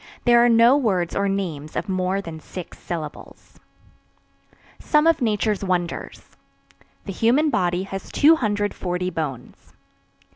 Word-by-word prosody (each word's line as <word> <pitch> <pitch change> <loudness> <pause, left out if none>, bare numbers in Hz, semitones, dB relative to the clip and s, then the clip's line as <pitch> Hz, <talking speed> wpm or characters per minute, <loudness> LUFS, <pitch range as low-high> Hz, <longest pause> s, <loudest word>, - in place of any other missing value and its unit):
There 240 -1 +6
are 240 - +4
no 235 +4 +5
words 190 -10 0
or 200 0 0
names 165 -7 -4
of - - -3
more 185 0 -1
than 165 -2 -8
six 180 +2 -10
syllables. 155 -4 -8 1.2
SOME 300 0 +2
OF 330 -3 +3
NATURE'S 210 -3 0
WONDERS. 180 -2 -3 0.8
The 195 - -5
human 260 - +2
body 180 -3 0
has 195 0 -7
240 205 - +1
bones. 140 -7 -6
195 Hz, 120 wpm, -22 LUFS, 175-230 Hz, 1.2 s, There